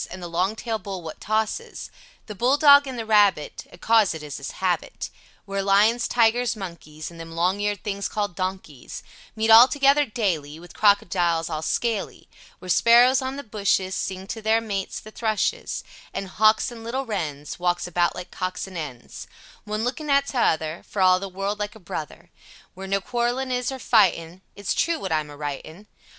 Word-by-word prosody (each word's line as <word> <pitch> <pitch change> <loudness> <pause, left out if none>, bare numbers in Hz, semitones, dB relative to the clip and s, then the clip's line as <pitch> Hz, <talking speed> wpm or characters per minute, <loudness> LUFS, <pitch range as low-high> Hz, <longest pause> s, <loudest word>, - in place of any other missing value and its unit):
And 185 -1 -8
the - - -4
long 180 +5 0
tale 225 -1 -3
Bull 195 -4 -7
wot 160 -1 -8
tosses 220 - -2 0.3
the 215 - -7
Bulldog 285 +6 +5
and 260 -2 -5
the 225 - -4
Rabbit, 205 -8 +2
acaus 215 0 +2
it 155 - -8
is 145 -2 -6
his 140 - -6
habbit; 185 -2 -2 0.3
Where 195 0 -2
Lions, 205 +5 +3
Tigurs, 240 +1 +2
monkees, 170 -5 -8
And 165 - -13
them 165 0 -9
long 180 +4 +1
ear'd 205 -1 -2
things 200 -1 -3
call'd 205 -4 -3
Donkeys, 185 -7 -5 0.3
Meat 220 0 +1
all 230 +3 +10
together 280 +1 +3
daylee 165 -10 -2
With 175 0 -13
Crockedyles 175 -5 +2
all 155 -1 -3
Skaley, 220 +5 -2 0.3
Where 185 - -12
sparros 240 +6 +5
on 260 +1 -3
the 285 - -6
bushis 200 -4 0
Sings 190 0 -4
to 225 - -9
there 220 +1 +3
mates, 200 -4 -4
the 215 - -13
thrushis, 220 - -2 0.3
an 195 - -3
Hawks 215 +5 +3
and 230 -1 -10
Littel 260 +4 -3
Rens 150 -8 -4
Wawks 175 0 0
about 175 0 0
like 180 - -8
Cocks 185 0 -4
and 185 -3 -7
Ens, 140 -6 -8 0.4
One 215 +1 -3
looking 265 +5 -3
at 280 0 +4
the - - -7
tuther 160 -9 0
for 195 - -2
all 185 0 +5
the 195 0 -6
World 195 +2 -3
like 210 +1 -4
a - - -13
Bruther. 160 -5 -7 0.4
Where 190 +1 -8
no 195 0 0
quarlin 245 +4 -1
is 250 +1 -1
or 265 - -5
Phytin, 185 -8 +2
its 200 -1 -2
tru 335 -1 +1
wot 190 - -5
ime 155 -1 0
aritin. 150 +5 -7
200 Hz, 185 wpm, -24 LUFS, 175-230 Hz, 0.4 s, all